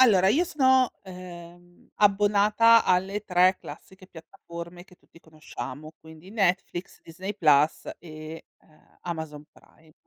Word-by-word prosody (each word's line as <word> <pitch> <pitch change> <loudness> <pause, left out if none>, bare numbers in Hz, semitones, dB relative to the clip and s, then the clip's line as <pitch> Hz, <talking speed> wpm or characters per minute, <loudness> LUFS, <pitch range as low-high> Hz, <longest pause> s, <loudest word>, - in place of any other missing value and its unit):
Allora 195 -7 +5
io 315 - +2
sono, 260 -5 +3
ehm, 175 -1 -13
abbonata 210 +3 +4
alle 190 +3 0
3 185 0 +3
classiche 190 0 -13
piattaforme 170 +1 -11
che 180 - -21
tutti - - -22
conosciamo, 155 0 -9
quindi: 160 +3 -15
Netflix, 190 -3 -2
Disney 190 +5 -7
Plus 150 -4 +2
e, 155 -1 -10 0.2
ehm, 155 - -27
Amazon 160 -4 -6
Prime. 160 -1 -24
180 Hz, 120 wpm, -25 LUFS, 160-200 Hz, 0.2 s, Allora